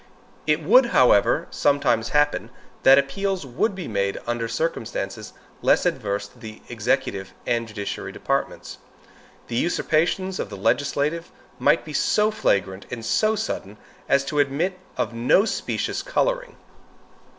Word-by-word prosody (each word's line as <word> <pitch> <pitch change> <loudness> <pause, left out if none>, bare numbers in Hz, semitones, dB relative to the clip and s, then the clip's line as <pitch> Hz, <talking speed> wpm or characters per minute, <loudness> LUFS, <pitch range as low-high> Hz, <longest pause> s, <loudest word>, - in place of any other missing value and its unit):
It 150 0 +1
might, 250 +5 +7
however, 125 - +4
sometimes 140 -5 +1
happen, 145 0 +1 0.3
that 135 +1 +7
appeals 185 +6 0
would 135 - -1
be 180 -4 -6
made 100 -2 -1
under 120 -1 -2
circumstances 110 -8 -3 0.3
less - - +3
adverse 100 0 -1
to - - -21
the 110 -1 -10
executive 95 -1 -1
and 115 -1 0
judiciary 105 -2 -5
departments. - - -3 0.7
The 115 - -4
usurpations 175 +4 0
of - - -3
the 100 - -7
legislature 145 - 0 0.3
might - - +3
be - - -8
so 215 0 +2
flagrant 95 - 0
and 115 -2 -6
so 215 - +2
sudden, 105 - -4 0.3
as 140 0 +3
to 150 +1 -1
admit 155 +7 0 0.2
of 120 -2 -1
no 120 - +3
specious - - -2
coloring. - - -1
140 Hz, 135 wpm, -23 LUFS, 110-180 Hz, 0.7 s, might